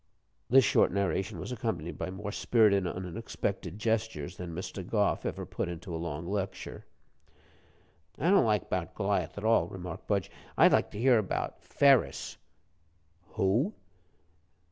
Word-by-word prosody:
This 130 0 +7
short - - +4
narration 95 0 -1
was - - -6
accompanied 110 - -3
by - - -2
more 100 +2 -5
spirited 105 -5 +3
and 90 +1 -4
unexpected 90 +2 -4
gestures 110 -8 -1
than 90 -1 -6
Mr. 95 +2 -5
Gough 105 +2 0
ever - - -4
puts - - -3
into 85 +1 -7
a - - -2
long 85 0 -4
lecture. 100 0 -4 1.3
"I 170 - +2
don't 200 - +6
like 105 -2 +1
'bout 90 0 -3
Goliath 100 0 -1
at 100 - -5
all," 115 +1 +3
remarked 90 -4 -8
Budge. 100 -3 0 0.3
"I'd - - +7
like - - +3
to - - -6
hear 120 -2 +5
'bout 95 - -3
Ferus." 140 -3 +3 1.0
"Who?" 115 - +1
100 Hz, 145 wpm, -30 LUFS, 90-110 Hz, 1.3 s, This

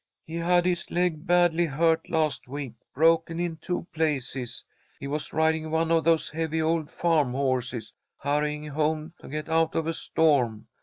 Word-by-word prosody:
"He 165 +1 -6
had 175 +1 +3
his 175 -1 0
leg 175 -3 -1
badly 175 -1 +4
hurt 160 +3 +1
last 155 -5 0
week, 135 -2 -5 0.2
broken 165 +2 +3
in 170 -2 -2
two 175 +1 -3
places. 135 -6 -2 0.4
He - - -7
was 150 +2 -3
riding 160 0 +1
one 160 +1 +1
of 165 -1 +3
those 165 -1 +3
heavy 160 0 -2
old 160 -1 0
farm 155 -8 +1
horses, 125 -4 -1 0.2
hurrying 150 +1 -1
home 155 +2 -1
to - - -12
get 155 +2 -4
out 160 0 +1
of 165 - 0
a 165 - -1
storm. 125 -11 +1
160 Hz, 165 wpm, -26 LUFS, 145-165 Hz, 0.4 s, badly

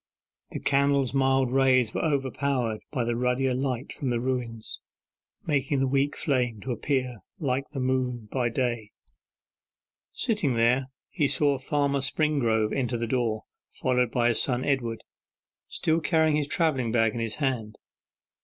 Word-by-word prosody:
The - - -5
candle's 140 -2 +2
mild 135 -2 +2
rays 130 -3 +3
were - - -1
overpowered 135 -5 0
by 130 -5 -1
the 120 0 -1
ruddier 125 +2 +1
light 130 0 -2
from 135 - -3
the 120 -1 0
ruins, 120 -3 -3 0.6
making 140 -2 +1
the 135 - +2
weak 140 +2 +1
flame 125 -6 0
to 130 - -4
appear 125 0 -1 0.2
like 140 -5 -1
the 135 - -5
moon 125 -3 -1
by 125 -3 0
day. 120 -3 -2 1.2
Sitting 210 - 0
there 125 +3 +3 0.2
he 150 -6 +1
saw 140 -1 +2
Farmer 140 0 0
Springrove 125 -7 +1
enter 125 -3 -1
the 115 - -2
door, 115 -3 -1 0.3
followed 125 -2 0
by 120 0 +2
his 115 - +2
son 125 -1 0
Edward, 120 -5 -1 0.6
still 160 +1 +1
carrying 160 -2 +3
his 150 -2 0
travelling 140 -9 +1
bag 115 -2 +2
in 120 - -4
his 115 -1 -2
hand. 125 -7 -2
130 Hz, 150 wpm, -27 LUFS, 120-140 Hz, 1.2 s, rays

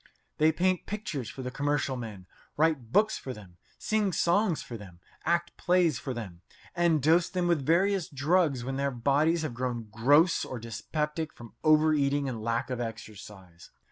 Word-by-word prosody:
They 155 +1 +5
paint 180 +2 0
pictures 150 - -4
for 130 - -8
the 125 - -4
commercial 145 -1 -1
men, 110 -7 -7 0.3
write 150 -7 +1
books 215 +5 +3
for 130 - -6
them, 95 -5 -14 0.2
sing 215 -3 0
songs 175 0 +2
for 120 - -8
them, 95 -6 -11 0.3
act 170 +1 0
plays 175 -5 +2
for 135 - -5
them, 100 -8 -7 0.3
and 170 -5 +2
dose 165 +3 +4
them 180 -1 -1
with 170 -5 +1
various 190 +4 +2
drugs 145 -2 +1
when 135 +2 -3
their 140 0 0
bodies 145 +6 +1
have 150 -6 -3
grown 120 -2 -3
gross 145 - +4
or 130 - -5
dyspeptic 150 +8 -3
from 115 -1 -13
overeating 150 -2 +3
and 120 -4 -4
lack 115 +3 -1
of 125 - -2
exercise. 105 -6 -9
140 Hz, 170 wpm, -29 LUFS, 120-170 Hz, 0.3 s, They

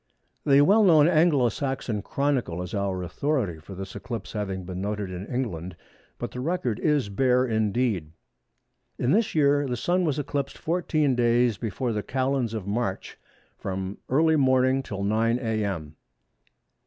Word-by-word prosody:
The 140 -1 +6
well 205 +9 +5
known 160 -6 +6
Anglo 155 -7 +4
Saxon 125 -4 -3
Chronicle 125 -9 -1
is 90 - -8
our 100 -3 -1
authority 100 - -1
for 95 +5 -10
this 95 0 -7
eclipse 115 -3 -6
having 95 -3 -3
been 90 +1 -6
noted 100 -1 -3
in 90 +3 -6
England, 95 -9 -3 0.4
but 120 - -5
the 125 - -7
record 130 -6 -1
is 150 -7 +1
bare 125 +5 +2
indeed:—"In 110 - -3
this 215 +1 +2
year 145 -1 +3
the 125 -1 -2
Sun 180 +8 +1
was 150 -4 0
eclipsed 140 -1 -3
14 155 -4 0
days 120 -1 +2
before 120 +1 -2
the 105 - -1
Calends 130 -2 -1
of 105 -4 -4
March 100 -1 -3 0.4
from 95 0 -4
early 160 +4 +4
morning 130 -1 +3
till 100 -6 -5
9 110 +3 +2
a.m." 100 - -3
120 Hz, 150 wpm, -26 LUFS, 100-140 Hz, 0.4 s, The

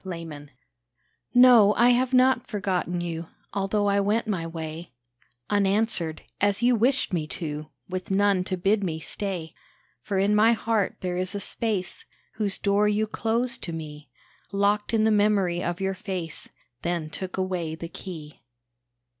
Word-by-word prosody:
A - - -11 0.2
MEMORY 145 -2 -9 0.9
No, 240 -5 +7
I 240 +2 +5
have 250 +1 +3
not 255 -1 +4
forgotten 180 -4 -1
you, 165 -1 -4 0.3
Although 200 +1 0
I 200 0 +3
went 210 +4 +1
my 185 -6 -2
way 165 -1 -7 0.5
Unanswered, 200 -5 +1 0.2
as 205 +2 +2
you 245 0 +5
wished 250 0 +1
me 160 -3 -1
to, 155 -3 -5 0.2
With 185 0 -5
none 195 -1 +3
to 185 - -2
bid 200 +3 +2
me 165 -4 -2
stay. 175 -1 -4 0.5
For 200 -2 -2
in 200 +2 +3
my 220 +2 +5
heart 225 -3 0
there 180 -1 -2
is 185 +2 -2
a - - -1
space 200 -2 -3 0.3
Whose 205 -3 0
door 200 +1 +2
you 210 +1 +2
closed 230 +3 -1
to 170 - -5
me, 150 -3 -8 0.4
Locked 205 +1 +1
in 225 -2 +2
the 220 - +4
memory 205 -4 +2
of 175 +1 -2
your 195 0 0
face; 185 -4 -5 0.3
Then 170 -3 -2
took 185 +2 -6
away 180 -4 -2
the 165 +1 -6
key. 160 -6 -9
195 Hz, 160 wpm, -26 LUFS, 175-210 Hz, 0.9 s, No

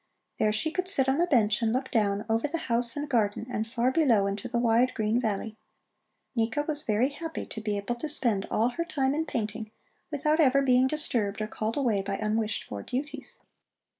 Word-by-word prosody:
There 215 - +3
she 220 +9 -1
could 370 +2 -2
sit 275 -9 +2
on 270 +5 +2
a 350 - +2
bench 220 -7 +3
and 225 -1 +2
look 260 +3 -2
down, 205 -2 +1
over 225 +4 +1
the 325 +3 -3
house 235 -3 +1
and 290 +1 -3
garden, 220 -5 0
and 220 -2 -2
far 240 +2 +1
below 250 -10 +3
into 200 +5 -3
the 240 0 -2
wide, 235 +1 +3
green 220 +1 +1
valley. 215 -1 -3 0.8
Nika 230 +5 0
was 300 -1 -2
very 225 +3 +1
happy 325 +3 -6
to 220 - -7
be 210 -1 -1
able 200 +4 -2
to 270 +6 -5
spend 230 -9 +1
all 230 +3 +2
her 335 +7 -3
time 275 -6 0
in 315 +2 -1
painting, 220 -2 -3 0.4
without 305 +1 0
ever 275 -2 +4
being 255 -1 +4
disturbed 240 -9 0
or 215 - -1
called 220 +2 -3
away 235 -8 +1
by 195 0 -3
unwished 215 0 -1
for 100 -1 -7
duties. 275 - -5
235 Hz, 205 wpm, -28 LUFS, 215-280 Hz, 0.8 s, ever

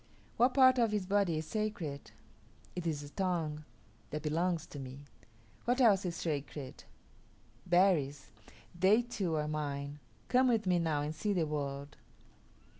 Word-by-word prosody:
What 250 +2 +3
part 260 -2 +6
of 230 -2 +4
his 210 -3 -1
body 195 -4 +2
is 155 - -3
sacred? 175 -7 -3 0.7
It 175 -2 -3
is 150 -3 -1
the 145 - -9
tongue; 160 -4 -2 0.4
that 150 +1 -4
belongs 165 +2 0
to 145 - -9
me. 135 +2 -8 0.6
What 245 +2 +1
else 205 -7 +5
is 170 -2 -2
sacred? 145 -4 -4 0.8
Berries. 160 - +2 0.4
They 190 +7 +4
too 200 -9 -2
are 150 -1 -1
mine. 145 -1 -3 0.3
Come 255 +1 +4
with 225 -4 +2
me 180 -1 +3
now 155 -3 0
and 150 +1 -3
see 205 +6 -1
the 175 -4 +1
world." 140 -1 -4
165 Hz, 150 wpm, -33 LUFS, 145-200 Hz, 0.8 s, part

